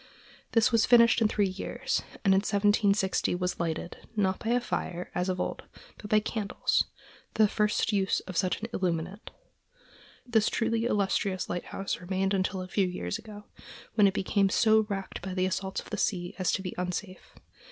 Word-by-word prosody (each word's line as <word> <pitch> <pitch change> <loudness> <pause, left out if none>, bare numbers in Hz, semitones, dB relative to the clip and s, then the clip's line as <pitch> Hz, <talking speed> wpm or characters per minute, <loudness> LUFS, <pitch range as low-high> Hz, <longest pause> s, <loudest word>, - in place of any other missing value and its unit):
This 230 +1 +4
was 230 -2 +3
finished 235 -1 +6
in 220 - +5
three 210 -1 +1
years, 190 +1 -2 0.2
and 195 - +6
in 190 - +5
1760 200 -2 +2
was 180 0 -2
lighted, 170 0 -3 0.2
not 190 -3 +1
by 225 - -4
a 245 +1 +3
fire, 180 -7 -4
as 180 +1 -1
of 185 -1 -1
old, - - -2 0.4
but 210 - -9
by 215 - +5
candles—the 215 0 -1
first 210 +1 +1
use 195 -1 +2
of 185 - -9
such 180 +2 +1
an - - -1
illuminant. 180 +2 -2 1.0
This 225 -3 +2
truly 230 0 0
illustrious 200 -3 0
lighthouse 190 +2 -3
remained 190 +2 -1
until 185 -1 -1
a - - -8
few 190 0 +1
years 90 - -3
ago, 210 -2 -11 0.5
when 210 -2 +5
it 195 - 0
became 195 0 +2
so 220 +1 +4
racked 195 -1 -4
by 185 0 -5
the 185 0 +1
assaults 190 +1 -2
of - - -15
the 210 - -2
sea 180 -4 -1
as 185 - +2
to 190 - -1
be 185 - -4
unsafe. 185 +1 -5
195 Hz, 175 wpm, -29 LUFS, 185-215 Hz, 1.0 s, finished